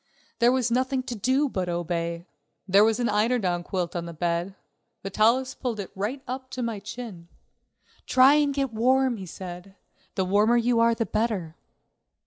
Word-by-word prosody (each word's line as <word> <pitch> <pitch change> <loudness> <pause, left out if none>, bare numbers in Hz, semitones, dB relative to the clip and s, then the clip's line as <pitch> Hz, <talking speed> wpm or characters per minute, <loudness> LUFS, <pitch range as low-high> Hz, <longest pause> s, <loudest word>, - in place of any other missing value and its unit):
There 235 +1 +5
was 255 -2 +1
nothing 255 +1 0
to 250 -2 -5
do 260 +7 +1
but 190 -8 -2
to 175 - -3
obey. 170 0 -3 0.4
There 200 +2 +6
was 225 +1 +2
an 240 - +1
eiderdown 210 -5 +1
quilt 175 -1 -3
on 170 -1 -3
the 170 - -8
bed. 175 +3 -2 0.5
Vitalis 230 +7 +2
pulled 240 -5 -4
it 195 - -6
right 225 +8 -3
up 260 +1 -5
to 250 - -1
my 230 -3 -3
chin. 210 -5 -8 0.8
"Try 260 +2 +6
and 295 -1 +3
get 275 -3 -2
warm," 255 +2 +2
he 190 -2 -8
said; 180 +2 -9 0.4
"the 190 - 0
warmer 210 +5 +3
you 235 0 +2
are 230 0 +4
the 230 - -1
better." 210 -9 -2
220 Hz, 175 wpm, -26 LUFS, 185-250 Hz, 0.8 s, There